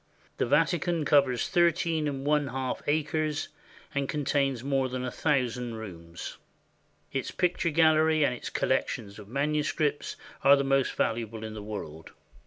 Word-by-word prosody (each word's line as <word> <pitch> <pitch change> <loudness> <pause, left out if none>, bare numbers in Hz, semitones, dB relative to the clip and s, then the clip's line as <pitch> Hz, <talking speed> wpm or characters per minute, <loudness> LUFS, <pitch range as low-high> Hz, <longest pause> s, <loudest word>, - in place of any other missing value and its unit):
The - - 0
Vatican 165 +3 +2
covers 140 -5 +3
thirteen 170 -3 +2
and 135 -1 -3
one 150 -1 +2
half 130 0 -3
acres 155 0 0 0.4
and 140 -1 -1
contains 140 -4 0
more 135 -1 +1
than 125 0 -3
a 125 - -3
thousand 125 -5 0
rooms. 85 -6 -8 0.7
Its 135 -1 -2
picture 180 -2 0
gallery 155 -1 +4
and 125 - +1
its 125 - -6
collections 110 -5 -1
of 105 - -11
manuscripts 145 +3 0 0.3
are 140 +1 +8
the 140 - 0
most 135 -1 +2
valuable 115 -1 -2
in 110 -1 -5
the 110 - -6
world. 90 -7 -7
140 Hz, 145 wpm, -28 LUFS, 120-150 Hz, 0.7 s, are